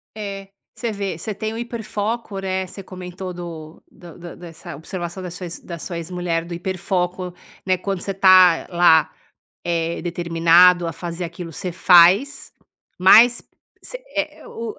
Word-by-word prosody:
É, 200 -2 -7 0.3
você 235 -2 -3
vê, 200 -5 -4
você 215 +6 -5
tem 215 +2 -4
o - - -6
hiperfoco, 225 -2 -4
né. 190 -1 -2
Você 195 - -10
comentou 185 0 -8
do 165 -3 -9
do 170 -3 -14
do 175 -1 -10
dessa 165 -4 -10
observação 175 +3 -6 0.4
da 170 -2 -8
sua 170 +1 -6
ex 170 +1 -7
mulher 175 -2 -2
do 170 - -7
hiperfoco, 180 0 -3 0.3
né, 185 -1 +2
quando 195 0 -4
você 195 - -3
tá 185 -3 +5
lá, 170 -3 +4 0.6
eh, 170 -1 -2
determinado 170 +1 +4
a 165 - -3
fazer 170 +2 -6
aquilo 170 0 -8
você 180 +4 -5
faz, 180 +10 +4 0.5
mas 225 +6 +6 0.4
você, - - -9
eh, - - -3
o 230 -2 -7
180 Hz, 150 wpm, -21 LUFS, 170-195 Hz, 0.6 s, mas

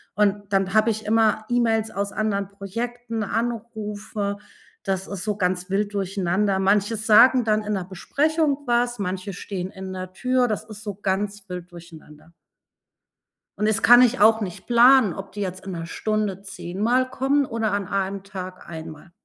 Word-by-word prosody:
Und, 205 -1 +1
dann 195 -1 +1
hab 215 +1 +4
ich 220 -1 -1
immer 215 0 +2
E-Mails 225 -2 +1
aus 200 0 -3
anderen 200 -2 -1
Projekten, 230 +4 -5
Anrufe, 215 -2 -3 0.4
das 190 -1 -2
ist 200 -3 -5
so 210 -1 -1
ganz 180 -1 -1
wild 205 +2 -1
durcheinander. 195 0 0
Manche 200 +3 +2
sagen 230 +4 +6
dann 215 -1 +1
in 210 0 -2
'ner 190 -2 -2
Besprechung 290 - 0
was, 240 0 +1
manche 190 +1 -3
stehen 185 0 -5
in 190 0 -8
der 185 0 -7
Tür, 255 +4 +1
das 215 -2 -2
ist 215 -1 -10
so 205 -3 -5
ganz 200 +1 -2
wild 180 -1 -7
durcheinander. 160 -2 -14 1.3
Und 210 - +2
das 220 +1 +1
kann 245 +1 +8
ich 250 +1 +2
auch 220 +2 +6
nicht 190 -5 -6
planen, 245 -3 +6
ob 195 0 -8
die 205 - -6
jetzt 185 -1 -5
in 195 - -5
'ner 165 -2 -5
Stunde 210 -1 -2
10 190 -2 -7
Mal 250 +4 +2
kommen 275 +2 +1
oder 225 -4 -2
an 200 -1 -1
1 195 0 -2
Tag 185 -2 -8
1 160 -1 -7
Mal. 155 +3 -15
205 Hz, 175 wpm, -23 LUFS, 190-225 Hz, 1.3 s, kann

